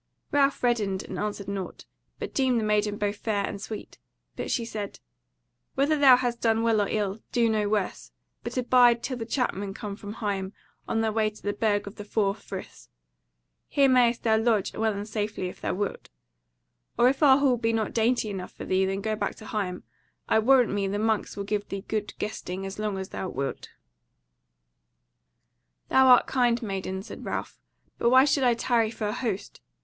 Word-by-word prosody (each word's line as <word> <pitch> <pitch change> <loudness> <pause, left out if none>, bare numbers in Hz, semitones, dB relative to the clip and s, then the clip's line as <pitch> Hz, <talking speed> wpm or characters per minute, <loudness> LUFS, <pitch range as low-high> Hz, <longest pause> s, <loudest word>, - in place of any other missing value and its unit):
Ralph 280 -2 +2
reddened 210 -6 +1
and 185 - -6
answered 205 -1 -3
nought; 195 -2 -5 0.3
but - - -6
deemed 260 -3 +2
the - - -2
maiden 210 -1 +1
both 205 0 -1
fair 205 -2 -1
and 200 - -6
sweet. 215 0 -8 0.4
But - - -4
she 235 - 0
said: 210 -3 -6 0.8
"Whether 285 +3 +2
thou 275 -4 +7
hast 245 -2 -2
done 225 -1 +2
well 225 -2 +3
or 200 - 0
ill, 205 -1 -1
do 235 -1 +3
no 215 -2 +1
worse; 205 -3 -2 0.3
but - - -5
abide 245 -1 +4
till 255 0 -3
the 225 -2 -5
Chapmen 205 -6 -2
come 210 -3 -5
from 205 0 -8
Higham, 200 -3 -3 0.3
on 225 - 0
their 220 -1 +1
way 215 0 +1
to 210 - -17
the 205 - -1
Burg 205 -1 0
of 200 +1 -9
the 205 - -6
Four 205 -1 0
Friths. 205 - -9 0.8
Here 280 -1 +3
mayst 245 -2 +3
thou 220 -1 +3
lodge 220 -3 +1
well 220 0 0
and 205 0 -5
safely 210 -3 -3
if - - -13
thou - - -1
wilt. 205 +1 -4 0.9
Or 240 - +5
if 265 +3 +1
our 270 -3 +7
hall 270 -3 +3
be 230 -1 0
not 220 -2 -1
dainty 230 -1 +1
enough 190 -2 -6
for - - -8
thee, 190 0 +2
then 195 +1 -2
go 215 +1 -1
back - - -2
to 215 - -12
Higham: 195 -5 -3 0.4
I - - +4
warrant 250 +1 +4
me 200 -1 0
the 200 +1 -2
monks 220 -1 0
will 200 - -2
give 205 0 -2
thee 195 +1 -6
good 215 -1 -3
guesting 195 -3 -4
as 195 +2 -7
long 210 -2 -2
as 190 0 -5
thou 190 - -4
wilt." 135 -2 -4 2.2
"Thou 265 0 +5
art 250 -1 +7
kind, 245 -2 +2
maiden," 190 -2 -4
said 230 - -9
Ralph, - - -4 0.4
"but 235 - +3
why 260 +2 +7
should 280 -1 +2
I 245 -2 +4
tarry 230 -1 +1
for 220 -1 -5
an - - -2
host? 220 -5 -4
215 Hz, 195 wpm, -27 LUFS, 200-240 Hz, 2.2 s, thou